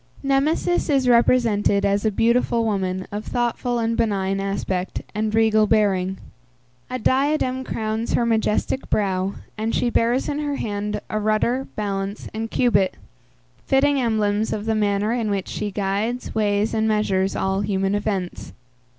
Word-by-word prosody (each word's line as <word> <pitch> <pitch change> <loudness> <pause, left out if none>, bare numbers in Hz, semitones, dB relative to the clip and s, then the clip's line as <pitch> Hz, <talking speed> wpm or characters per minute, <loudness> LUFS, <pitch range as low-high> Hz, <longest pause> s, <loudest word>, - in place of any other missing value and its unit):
Nemesis 290 +6 +1
is 270 -3 +2
represented 230 -4 +3
as 200 0 +1
a - - +4
beautiful 230 +2 +2
woman 185 -3 -1
of 205 +1 -4
thoughtful 240 +1 -1
and 230 0 0
benign 195 -4 0
aspect 195 -2 -3
and 215 +1 -1
regal 220 -1 +4
bearing; 190 -3 +2 0.7
a 255 - -2
diadem 260 +1 +1
crowns 220 -1 -2
her 235 - +2
majestic 225 +3 0
brow, 190 -1 0 0.2
and 220 +1 -1
she 240 - +1
bears 235 +3 +1
in 295 0 -2
her 290 -1 -2
hand 210 -3 -3
a 215 - 0
rudder, 215 +5 0
balance, 200 -1 -3
and 225 +1 -4
cubit; 200 -7 +2 0.7
fitting 275 +1 +3
emblems 215 -2 +1
of 210 0 -3
the 225 - +1
manner 205 0 +1
in 230 -3 -1
which 200 -2 -2
she 210 - -3
guides, 205 +5 -2
weighs, 210 0 +1
and 220 0 +1
measures 195 -3 +1
all 190 +1 0
human 195 -1 0
events. 200 -3 -3
215 Hz, 150 wpm, -22 LUFS, 200-235 Hz, 0.7 s, a